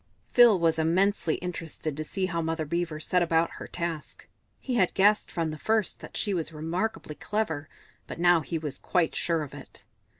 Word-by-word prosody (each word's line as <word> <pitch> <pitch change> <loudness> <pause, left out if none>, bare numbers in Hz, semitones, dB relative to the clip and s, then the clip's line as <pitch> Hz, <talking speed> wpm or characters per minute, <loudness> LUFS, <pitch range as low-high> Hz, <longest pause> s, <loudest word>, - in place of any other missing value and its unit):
Phil 235 -6 +7
was 165 -1 +2
immensely 175 +1 +2
interested 160 -3 -4
to 155 - -3
see 190 +4 -2
how 170 -2 -2
Mother 160 -1 -2
Beaver 170 0 -2
set 180 +3 +1
about 165 -1 +2
her - - -7
task; 170 -4 -5 0.3
he 260 - -4
had 190 -7 +2
guessed 205 +2 +4
from 165 -2 -2
the 155 - -7
first 220 -3 +1
that - - -8
she 205 - 0
was 170 -3 -2
remarkably 165 +3 -3
clever, 160 -6 -3 0.4
but - - -7
now 175 -1 +5
he 165 +1 -3
was 150 -3 -5
quite 175 -3 +1
sure 165 -2 0
of 145 - -9
it. - - -12
170 Hz, 190 wpm, -27 LUFS, 160-185 Hz, 0.4 s, Phil